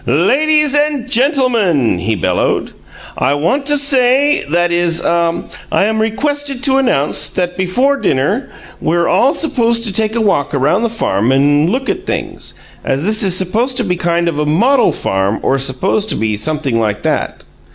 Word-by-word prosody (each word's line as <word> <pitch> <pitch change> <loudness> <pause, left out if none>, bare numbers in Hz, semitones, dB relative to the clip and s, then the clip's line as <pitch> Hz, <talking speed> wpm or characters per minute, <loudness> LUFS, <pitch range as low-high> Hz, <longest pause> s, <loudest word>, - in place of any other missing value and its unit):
"Ladies 285 - +2
and 290 -3 0
gentlemen," 235 - +1
he 110 +5 -1
bellowed, 90 - -1 0.4
"I 140 - 0
want 265 - -1
to 295 0 +3
say 280 0 +2
that 175 +2 +1
is 170 -1 +1
ah 170 0 0 0.3
I - - +2
am 220 +1 0
requested 275 +4 -2
to 270 -1 +3
announce 150 - +1
t - - -14
that 180 0 -2
before 245 +10 0
dinner 195 - -1 0.3
we're 170 +1 0
all 265 - +3
supposed 235 -7 0
to 210 -4 -1
take 220 +2 0
a - - 0
walk 170 -9 0
around 140 +9 +1
the 235 - 0
farm 120 - -1
and 145 +4 +2
look 260 +6 -2
at - - -3
things, - - -5 0.3
as 135 +2 -2
this 215 +3 +2
is 185 -3 +2
supposed 225 +8 -1
to 245 - +1
be 180 -4 -1
kind 170 0 -1
of 160 -3 -2
a 150 - 0
model 240 - +3
farm 95 +2 -1
or 135 - +1
supposed 180 +11 0
to - - +1
be 110 -1 -1
something 135 +1 -2
like 105 -2 -2
that. - - -2
195 Hz, 180 wpm, -14 LUFS, -, 0.4 s, to